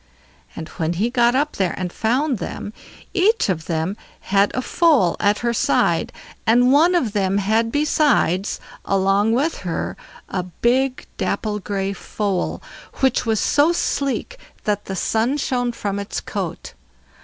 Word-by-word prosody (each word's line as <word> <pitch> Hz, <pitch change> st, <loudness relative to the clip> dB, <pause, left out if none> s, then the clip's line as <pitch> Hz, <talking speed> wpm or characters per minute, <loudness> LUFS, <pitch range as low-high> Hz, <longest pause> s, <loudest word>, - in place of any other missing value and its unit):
And 160 Hz, -, -6 dB
when 165 Hz, +1 st, 0 dB
he 215 Hz, +7 st, 0 dB
got 240 Hz, 0 st, +3 dB
up 295 Hz, +3 st, 0 dB
there 185 Hz, -4 st, 0 dB
and 180 Hz, -1 st, -4 dB
found 255 Hz, +2 st, 0 dB
them, 205 Hz, -, -6 dB, 0.4 s
each 415 Hz, -, +2 dB
of 160 Hz, -4 st, -1 dB
them 165 Hz, +4 st, -1 dB, 0.3 s
had 200 Hz, +1 st, +2 dB
a 255 Hz, -, 0 dB
foal 290 Hz, -, +3 dB
at 205 Hz, +1 st, +2 dB
her 235 Hz, -, +2 dB
side, -, -, +1 dB, 0.4 s
and 245 Hz, +3 st, +5 dB
one 335 Hz, +5 st, +5 dB
of 245 Hz, -12 st, +1 dB
them 195 Hz, -2 st, +1 dB
had 220 Hz, +3 st, +1 dB
besides, 290 Hz, -, +2 dB, 0.2 s
along 195 Hz, +3 st, +2 dB
with 290 Hz, +7 st, 0 dB
her, 175 Hz, -3 st, -3 dB, 0.3 s
a 185 Hz, -, -2 dB
big 250 Hz, +9 st, 0 dB
dapple 210 Hz, -1 st, -1 dB
gray 195 Hz, 0 st, -2 dB
foal, 200 Hz, 0 st, -3 dB, 0.3 s
which 265 Hz, -2 st, +1 dB
was 220 Hz, -2 st, +2 dB
so 295 Hz, +3 st, +3 dB
sleek 345 Hz, -, -2 dB, 0.2 s
that 205 Hz, -1 st, -1 dB
the 190 Hz, -, -4 dB
sun 225 Hz, +8 st, 0 dB
shone 245 Hz, -4 st, 0 dB
from 205 Hz, -4 st, -3 dB
its 200 Hz, -, -4 dB
coat. -, -, -5 dB
220 Hz, 150 wpm, -21 LUFS, 195-265 Hz, 0.4 s, and